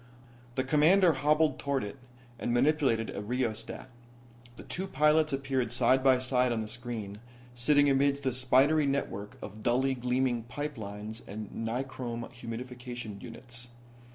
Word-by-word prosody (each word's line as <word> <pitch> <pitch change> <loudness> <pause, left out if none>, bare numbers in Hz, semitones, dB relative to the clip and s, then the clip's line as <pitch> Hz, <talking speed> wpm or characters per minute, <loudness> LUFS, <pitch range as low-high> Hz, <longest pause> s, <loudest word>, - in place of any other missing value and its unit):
The 130 - +1
Commander 160 +6 +5
hobbled 150 +1 +2
toward 140 -1 -1
it, 105 +6 -6 0.4
and - - -1
manipulated 125 -3 +2
a - - -3
rheostat. 115 0 -3 0.7
The - - -10
two 190 +2 -4
pilots 150 0 +3
appeared 135 -3 -1
side 130 +1 +3
by 130 -1 +6
side 125 -1 +1
on 115 - 0
the 110 - -4
screen, 110 -3 -6 0.3
sitting 145 +4 +4
amidst 140 0 +2
a 130 - +1
spidery 135 +4 +4
network 135 -7 -3
of 105 +1 -8
dully 130 +4 +2
gleaming 125 -1 0
pipe 145 +2 -5
lines 105 +2 -6
and 105 +1 -7
nichrome 120 0 -4
humidification 120 -2 -7
units. 120 +1 -8
125 Hz, 140 wpm, -30 LUFS, 115-140 Hz, 0.7 s, by